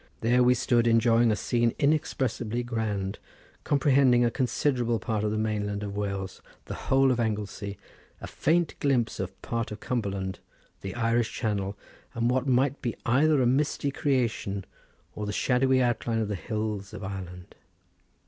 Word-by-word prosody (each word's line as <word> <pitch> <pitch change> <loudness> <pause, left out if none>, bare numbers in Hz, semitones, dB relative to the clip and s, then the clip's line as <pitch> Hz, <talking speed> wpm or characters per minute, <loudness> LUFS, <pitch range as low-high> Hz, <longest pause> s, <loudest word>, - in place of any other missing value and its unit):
There 120 +2 +3
we 125 0 +5
stood 120 -1 +2
enjoying 115 0 +4
a - - +2
scene 120 +1 0
inexpressibly 130 -6 0
grand, 105 -5 -2 0.4
comprehending 135 -4 +4
a 120 - +1
considerable 125 -1 0
part 110 -2 -2
of 105 - +1
the 110 - -1
mainland 105 -1 -1
of 100 -1 -5
Wales, 100 -2 -4 0.2
the - - -6 0.2
whole 135 0 +5
of 125 - 0
Anglesey, 105 -2 -3 0.4
a - - -7
faint 165 +1 +1
glimpse 130 -5 +1
of - - -5
part 115 -1 -2
of 105 - -6
Cumberland; 100 -6 -3 0.4
the 95 - -6
Irish 115 -1 +1
Channel, 100 -3 -2 0.4
and 120 +1 +1
what 130 +1 0
might 130 +2 +2
be 120 -3 -2
either 140 +3 +3
a - - +2
misty 140 +2 +1
creation 115 -9 -1 0.5
or 105 -1 -5
the - - -2
shadowy 130 +3 +2
outlines 115 -2 0
of 105 - -4
the - - -1
hills 105 -1 -4
of 100 - -7
Ireland. 90 -2 -7
115 Hz, 160 wpm, -27 LUFS, 105-125 Hz, 0.5 s, we